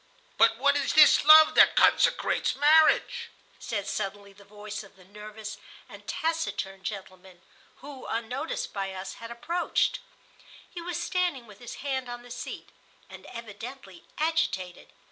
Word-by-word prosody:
"But - - +4
what - - +3
is - - 0
this - - +7
love 310 0 +8
that - - +6
consecrates - - +2
marriage?" 315 - +3 0.3
said, 205 -4 -4
suddenly, 200 -1 -5
the 200 +1 -18
voice 210 +1 -8
of 200 0 -18
the 185 -1 -19
nervous 210 +2 -9 0.3
and - - -14
taciturn 320 -12 -3
gentleman, 190 -3 -9 0.4
who, 275 -1 -10
unnoticed 240 +7 -4
by 195 -1 -4
us, 190 +1 -7
had 230 - -8
approached. 330 +10 -1 0.7
He 345 - -9
was 345 -1 -4
standing 355 -9 -1
with 210 -3 -16
his 240 - -9
hand 260 -3 -2
on 240 0 -7
the 245 - -14
seat, 245 - -7 0.4
and - - -12
evidently 230 -3 -10
agitated. 205 - -2
230 Hz, 145 wpm, -27 LUFS, 200-295 Hz, 0.7 s, love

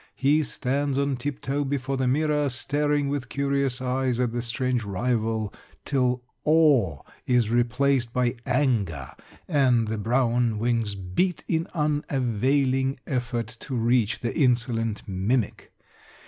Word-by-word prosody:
He 145 +3 +3
stands 140 -1 -1
on 140 -1 +1
tiptoe 140 +2 -2
before 135 -1 -2
the 130 -1 0
mirror, 150 +1 +1
staring 145 +2 0
with 140 -3 -3
curious 140 -2 0
eyes 130 -1 0
at 125 -2 +1
the 120 +1 -2
strange 125 +1 -1
rival 110 +1 -1 0.3
till 125 -3 +1 0.2
awe 145 - +3 0.2
is 120 -3 +2
replaced 120 +1 +2
by 125 -1 +1
anger 110 - 0 0.4
and 130 -8 +3
the 110 -1 -2
brown 120 0 +1
wings 115 -2 0
beat 95 - -1
in 165 0 0
unavailing 135 -2 +1
effort 120 -3 -3
to 135 - -5
reach 115 -2 +1
the 120 - -2
insolent 120 -5 0
mimic. 100 +5 -1
125 Hz, 125 wpm, -25 LUFS, 115-140 Hz, 0.4 s, He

